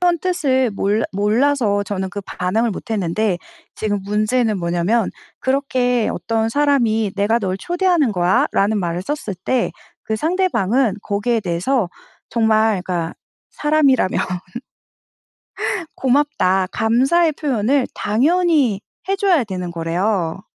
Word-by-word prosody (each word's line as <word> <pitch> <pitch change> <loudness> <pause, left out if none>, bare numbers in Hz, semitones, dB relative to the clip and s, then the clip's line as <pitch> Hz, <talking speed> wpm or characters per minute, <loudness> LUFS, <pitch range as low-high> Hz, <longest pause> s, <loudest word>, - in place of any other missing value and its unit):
표현 350 -1 +2
뜻을 270 -9 +1
몰라 205 +2 0
몰라서 210 +1 +2
저는 190 -1 -3
그 205 +2 -6
반응을 215 +6 -1
못 225 +4 -8
했는데 200 -1 0 0.4
지금 205 -2 -2
문제는 215 +1 +1
뭐냐면 175 +6 0 0.3
그렇게 255 -3 +1
어떤 225 0 -1
사람이 230 -7 +2
"내가 215 +4 +2
널 190 -3 -2
초대하는 345 - +1
거야"라는 195 +3 +2
말을 175 -1 -2
썼을 285 -6 -4
때 255 -2 0 0.3
그 220 - -2
상대방은 265 - +1
거기에 215 +3 0
대해서 185 +4 0 0.4
정말 220 -3 +2
그니까 175 -3 -3 0.4
사람이라면 295 -9 +2 1.8
"고맙다." 250 -9 +2
감사의 270 +9 +2
표현을 265 -2 0
당연히 280 - +2 0.3
해 390 - +1
줘야 370 -8 +3
되는 180 -4 -5
거래요. 175 +2 -1
220 Hz, 270 characters per minute, -19 LUFS, 195-275 Hz, 1.8 s, 줘야